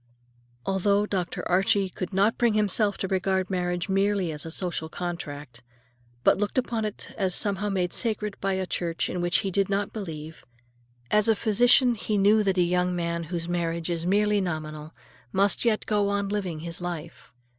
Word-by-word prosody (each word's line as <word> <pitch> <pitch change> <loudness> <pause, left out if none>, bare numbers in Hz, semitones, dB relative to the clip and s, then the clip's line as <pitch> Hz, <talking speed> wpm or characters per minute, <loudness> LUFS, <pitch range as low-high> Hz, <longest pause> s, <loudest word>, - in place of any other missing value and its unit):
Although 200 +2 +2
Dr. 185 -4 -3
Archie 195 +2 +3
could 185 - -5
not 200 +4 +2
bring 235 -3 +3
himself 210 0 +1
to 190 - -2
regard 190 0 0
marriage 180 -1 -1
merely 195 -2 +1
as 150 +1 -4
a - - -5
social 165 -2 -3
contract, 150 -8 -6 0.6
but - - +4
looked 205 +4 -2
upon 230 -3 0
it 210 - -7
as 190 -2 +1
somehow 205 0 0
made 180 -3 -1
sacred 210 -3 -1
by 195 0 0
a 190 0 -1
church 170 -2 -2
in 180 - -2
which 175 +1 +2
he 195 - -2
did 195 +1 +1
not 200 0 -1
believe,—as 120 - -4
a 225 - +5
physician 240 +4 +4
he 215 -1 -2
knew 205 +2 +5
that 195 -2 +1
a 180 - +5
young 180 +1 +1
man 170 -1 -2
whose 170 0 -4
marriage 170 -1 -2
is 170 0 -2
merely 205 +1 +3
nominal 155 -3 -4 0.4
must 200 +4 +3
yet 220 -2 +2
go 205 -2 +1
on 200 0 -1
living 190 -6 -3
his 170 +1 -6
life. 175 -3 -6
190 Hz, 175 wpm, -26 LUFS, 170-205 Hz, 0.6 s, a